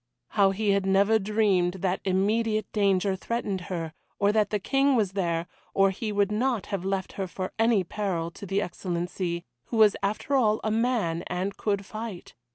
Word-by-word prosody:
How 200 -2 +4
he 205 +1 +1
had 200 0 +2
never 200 +3 +4
dreamed 200 -4 +2
that 185 -1 0
immediate 215 +3 +1
danger 195 -2 +2
threatened 200 -2 -3
her, 165 -3 -3 0.2
or 200 0 +3
that 210 -1 +2
the 210 - 0
King 270 +6 +2
was 210 -6 +1
there, 170 -4 -1 0.3
or 195 0 +4
he 210 +3 -4
would 205 0 +1
not 235 0 0
have 190 -3 -1
left 190 -1 -2
her 195 -1 -3
for 185 +1 -5
any 225 -3 +4
peril 175 -3 -2
to 200 - -9
the 195 +2 +1
Excellency, 175 -1 -3 0.2
who 230 - -4
was 215 -2 +6
after 210 +7 -2
all 220 -5 +3
a 215 - 0
man 220 -8 0
and 185 +3 -2
could 200 -2 -1
fight. 215 -4 -7
200 Hz, 180 wpm, -27 LUFS, 185-215 Hz, 0.3 s, was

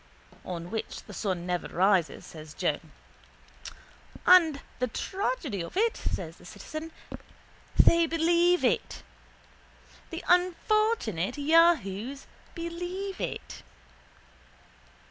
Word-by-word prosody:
—On 175 -1 -6
which 220 - -4
the 210 - -12
sun 185 -4 -2
never 180 -1 -2
rises, 185 -2 +1
says 155 -1 -11
Joe. - - 0 1.5
—And 330 -6 +6 0.2
the 250 - +1
tragedy 370 - -3
of 170 - -7
it 455 +2 +1
is, - - +1
says 165 -2 -7
the - - -17
citizen, 310 - -8 0.9
they 335 0 +6
believe 340 +2 +3
it. - - 0 1.1
The 330 +1 -6
unfortunate 360 - +1
yahoos 280 - +2 0.3
believe 355 +3 -5
it. - - -5
310 Hz, 100 wpm, -28 LUFS, -, 1.5 s, And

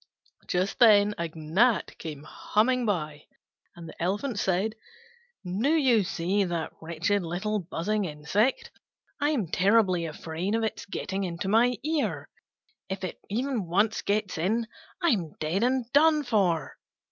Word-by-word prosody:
Just 185 +2 -1
then 210 -3 +6
a 170 - -1
gnat 185 +8 +1
came 150 -3 -7
humming 235 +9 0
by, 155 -6 -2 0.5
and 170 -1 -10
the - - -11
Elephant 205 +6 -1
said, 195 +4 0 0.7
"Do 195 +10 0
you 265 -9 +4
see 185 +3 0
that 170 -3 -3
wretched 170 +5 0
little 185 +5 -2
buzzing 195 +4 -2
insect? 175 - 0 0.5
I'm 290 -7 +1
terribly 185 -2 +2
afraid 165 +6 -3
of 225 - 0
its 220 - -3
getting 195 0 -3
into 175 +1 -4
my 235 +4 +3
ear: 310 0 -1 0.6
if 190 0 -4
it 185 - -5
once 215 -3 0
gets 205 -4 -1
in, 220 +7 +1 0.4
I'm 200 - +1
dead 160 +6 -1
and 255 0 +1
done 305 +1 +5
for." 195 - 0
200 Hz, 135 wpm, -27 LUFS, 170-230 Hz, 0.7 s, then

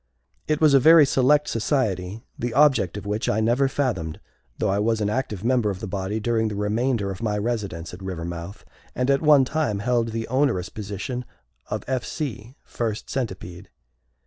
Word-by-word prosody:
It 155 -1 +1
was 155 -3 +5
a 135 - +7
very 160 +2 +8
select 140 +2 +3
society, 110 -5 -1
the 120 -1 -4
object 135 - +4
of 105 - -7
which 105 +2 -1
I 105 - +1
never 120 +5 +2
fathomed, 125 - -2 0.4
though - - 0
I 100 - +1
was 110 +1 +1
an 105 -1 0
active 110 -5 -3
member 120 -3 +2
of 95 -2 -4
the - - -5
body 100 +2 -3
during 110 0 +1
the 105 - -4
remainder 105 +1 0
of 95 - -8
my 105 -2 0
residence 100 -7 -3
at 90 - -9
Rivermouth, 85 0 -6 0.3
and 125 +2 +1
at 140 - +2
one 150 -3 +6
time 130 -8 -1
held 120 +2 +1
the 115 0 -4
onerous 125 -8 +1
position 105 +4 -5 0.5
of - - -3
F. 130 -1 -1
C., 130 -5 -5
First 110 -3 -4
Centipede. 95 -7 -5
115 Hz, 180 wpm, -24 LUFS, 100-130 Hz, 0.5 s, very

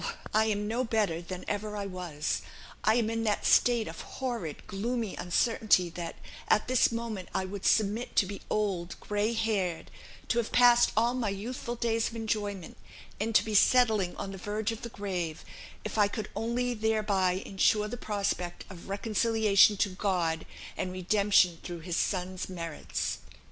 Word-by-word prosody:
I 215 +1 +4
am 210 -1 -1
no 235 +4 0
better 215 -8 0
than 180 +1 -7
ever 210 0 -3
I 200 - -3
was. 180 -6 -3 0.4
I 215 - +4
am 235 -2 +2
in 225 0 -1
that 210 -1 0
state 240 -2 +4
of - - -7
horrid, 235 - -5
gloomy 225 +1 -2
uncertainty 185 -1 +2
that, 170 0 -6 0.3
at 215 - +3
this 255 -1 +4
moment, 230 -5 -4
I 190 - 0
would 195 +1 -3
submit 220 +3 +1
to 205 - +4
be 200 +1 -7
old, 190 -5 -1
grey 210 +2 -1
haired, 205 -7 -1 0.4
to 235 - +2
have 230 - -2
passed 240 -1 +6
all 235 +2 +3
my 245 -5 -1
youthful 235 +4 -4
days 230 -1 0
of 230 - -11
enjoyment, 205 -5 -3 0.4
and 220 +2 -2
to - - +5
be 220 - -3
settling 215 -4 +4
on 195 - -5
the 195 - -8
verge 210 +3 -2
of 225 - -7
the 235 - -6
grave, 180 -7 -4 0.4
if 215 +1 -3
I 205 - +6
could 210 0 -5
only 240 +3 -1
thereby 215 -4 +1
ensure 200 +2 +1
the 235 - -5
prospect 200 -6 -2
of 185 0 -11
reconciliation 215 0 +3
to 200 - +2
God, 180 -4 -1 0.3
and 185 - -3
redemption 185 -2 +3
through 175 -1 -7
his 170 0 -3
Son's 185 0 -1
merits. 165 -4 -4
210 Hz, 170 wpm, -29 LUFS, 185-225 Hz, 0.4 s, passed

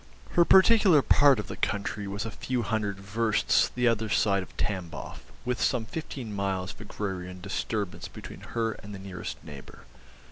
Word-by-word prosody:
Her 170 - +5
particular 190 - +6
part 140 -3 +6
of 105 - -3
the - - -6
country 100 +1 -2
was 100 +1 -3
a 115 - -4
few 125 +2 -2
hundred 105 -2 -1
versts 110 +3 +2
the 125 0 0
other 110 -1 +1
side 100 -2 +2
of 90 - -11
Tamboff, 90 -5 -3 0.3
with 125 -2 -1
some 120 -4 +1
fifteen 125 -4 -6
miles 95 -1 -1
of - - -15
agrarian 95 -3 -5
disturbance 100 +1 -3
between - - -10
her 115 -1 -1
and 105 -1 -9
the - - -7
nearest 95 -2 -6
neighbour. 70 -2 -11
105 Hz, 170 wpm, -28 LUFS, 95-115 Hz, 0.3 s, particular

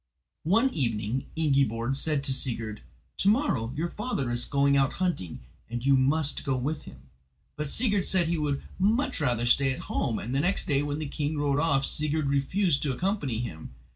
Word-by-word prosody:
One 230 +7 +4
evening 115 -2 -1
Ingiborg 135 -5 +1
said 145 0 0
to 135 - +1
Sigurd: 115 -5 -2 0.4
"To 195 - +3
morrow 205 - +1
your 165 +4 -1
father 205 - -2
is 120 0 +1
going 140 0 +2
out 135 0 +2
hunting, 170 - -2 0.3
and 120 +1 -4
you 140 0 +5
must 140 +3 +1
go 135 -3 0
with 145 +5 -3
him." 65 0 -12 0.5
But 150 -1 -3
Sigurd 205 - +1
said 185 -2 +3
he 170 -1 0
would 145 -2 -1 0.2
much 215 - +1
rather 120 -4 +1
stay 135 +3 +4
at 130 - -4
home, 115 -5 0
and 120 +5 -5
the 135 - +2
next 180 +7 +1
day 140 -1 +1
when 145 0 -2
the 155 - -3
king 150 +2 -2
rode 145 -1 +1
off 140 -4 +2
Sigurd 155 +1 -1
refused 140 +3 +1
to 145 - 0
accompany 145 - -1
him. 80 - -7
140 Hz, 190 wpm, -27 LUFS, 125-160 Hz, 0.5 s, you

